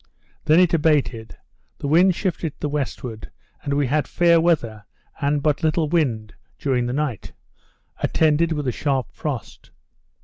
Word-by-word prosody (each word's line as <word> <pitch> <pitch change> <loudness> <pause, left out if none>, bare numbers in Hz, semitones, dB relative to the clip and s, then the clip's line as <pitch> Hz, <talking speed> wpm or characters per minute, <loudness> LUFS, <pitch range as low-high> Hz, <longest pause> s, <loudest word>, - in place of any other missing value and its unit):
Then 155 +3 +5
it 180 -2 +4
abated; 145 -8 +1 0.4
the - - -5
wind 175 +5 +4
shifted 170 -5 -2
to - - -35
the 150 - -1
westward; 125 -6 -4 0.3
and 140 -1 -2
we 145 0 +2
had 145 +4 0
fair 170 -1 +4
weather, 115 - 0 0.3
and 145 0 0
but 150 -1 +1
little 160 0 +1
wind, 120 -10 0 0.2
during 125 -3 0
the - - -2
night; 140 -5 -3 0.7
attended 160 +1 +2
with 150 -3 -2
a - - +2
sharp 135 -1 -2
frost. 140 -7 -6
150 Hz, 150 wpm, -22 LUFS, 125-160 Hz, 0.7 s, Then